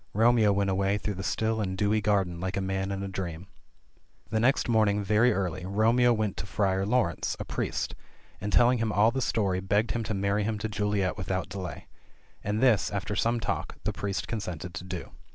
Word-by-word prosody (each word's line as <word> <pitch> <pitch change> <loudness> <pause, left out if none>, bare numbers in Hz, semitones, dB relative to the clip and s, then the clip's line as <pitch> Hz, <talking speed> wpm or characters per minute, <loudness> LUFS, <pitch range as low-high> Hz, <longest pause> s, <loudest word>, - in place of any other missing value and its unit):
Romeo 115 -1 +5
went 100 -1 +1
away 95 +1 +1
through 105 0 -3
the 95 - -6
still 110 +3 0
and 95 -2 -2
dewy 105 +2 +2
garden 95 -5 +1
like 95 +1 -3
a - - +1
man 95 0 -2
in 100 0 -3
a - - -3
dream. 90 -2 -5 0.9
The 110 - +1
next 130 +5 +2
morning 105 -3 +3
very 105 +5 +4
early 95 -3 -2
Romeo 115 +6 +3
went 110 -4 0
to 100 - -5
Friar 95 -1 0
Laurence, 105 -7 +1
a - - -4
priest, - - -2 0.5
and, 105 +2 -3
telling 120 +2 +5
him 115 -1 0
all 105 +2 +4
the 130 - -2
story, 100 -6 +1
begged 105 +4 +1
him 115 0 -1
to 110 0 -2
marry 100 +1 +1
him 110 +1 -1
to 105 +2 -3
Juliet 105 -2 -1
without 95 -1 -2
delay. 95 -2 -6 0.6
And 105 +2 -1
this, 115 -6 +4
after 100 0 -3
some 115 +4 +1
talk, - - -3
the - - -1
priest 100 -1 -3
consented 90 -6 -5
to - - -6
do. 90 -2 -6
100 Hz, 205 wpm, -28 LUFS, 95-110 Hz, 0.9 s, Romeo